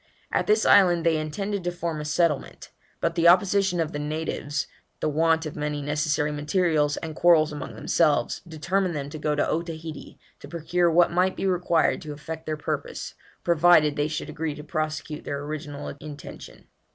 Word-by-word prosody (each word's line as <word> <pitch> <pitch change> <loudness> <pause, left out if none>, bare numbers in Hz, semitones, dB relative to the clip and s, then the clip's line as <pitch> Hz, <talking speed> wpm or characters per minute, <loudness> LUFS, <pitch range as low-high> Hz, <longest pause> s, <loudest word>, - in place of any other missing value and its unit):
At - - 0
this 215 +1 +3
island 175 -4 +5
they 165 -1 +3
intended 195 +6 -3
to 175 - -1
form 170 -3 -4
a - - -6
settlement, 155 -1 -1 0.3
but 170 - +1
the 170 0 +3
opposition 190 0 +4
of 160 -2 0
the 145 - -4
natives, 150 -1 -3 0.3
the - - -1
want 160 +2 +2
of 155 - -6
many 150 0 -2
necessary 150 +1 0
materials, 150 -1 +1
and 160 -2 -6
quarrels 160 -3 +4
among 150 -1 -7
themselves, 150 -7 +1
determined 175 +3 -1
them 140 -1 -4
to 155 - -7
go 150 0 0
to 145 - +1
Otaheite 165 -1 -5 0.2
to - - -11
procure 170 +2 0
what 170 +1 +4
might 180 +2 +2
be - - -3
required 180 -2 +2
to 150 -1 -6
effect 160 +2 -8
their 155 -1 -2
purpose, 150 - -4 0.3
provided 170 -3 +5
they 145 +1 0
should 155 -1 -4
agree 155 -1 -3
to 150 - -9
prosecute 155 -1 -4
their 140 0 -4
original 145 -1 -6
intention. 150 -1 -10
155 Hz, 175 wpm, -25 LUFS, 150-175 Hz, 0.3 s, island